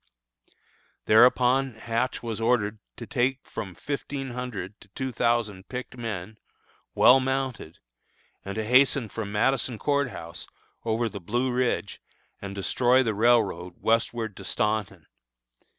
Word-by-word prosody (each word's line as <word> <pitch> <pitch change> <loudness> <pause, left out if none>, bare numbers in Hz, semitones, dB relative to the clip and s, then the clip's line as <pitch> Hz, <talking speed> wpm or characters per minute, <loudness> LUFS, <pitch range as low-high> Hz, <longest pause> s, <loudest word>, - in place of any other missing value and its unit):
Thereupon 125 +3 +4
Hatch 115 +3 -2
was 115 -1 -4
ordered 110 -2 +1 0.2
to - - -7
take 130 -1 0
from 95 -4 -6
fifteen 140 - -4
hundred 120 -5 -6
to - - -15
two 130 -1 -3
thousand 110 -5 0
picked 125 0 -6
men, 110 -3 -6 0.6
well 130 +2 +7
mounted, 130 -10 -3 0.7
and 100 - -6
to 110 0 -2
hasten 125 0 +4
from 105 -1 -5
Madison 120 +2 +1
Court 140 +1 +1
House, 85 -5 -8 0.4
over 115 +1 0
the 100 -2 -7
Blue 120 +8 -1
Ridge, 125 -4 -1 0.4
and 100 0 -6
destroy 125 +6 +3
the 115 -3 0
railroad 105 -6 +2
westward 115 -1 0
to 95 - -9
Staunton. 100 -3 -1
115 Hz, 130 wpm, -26 LUFS, 105-125 Hz, 0.7 s, well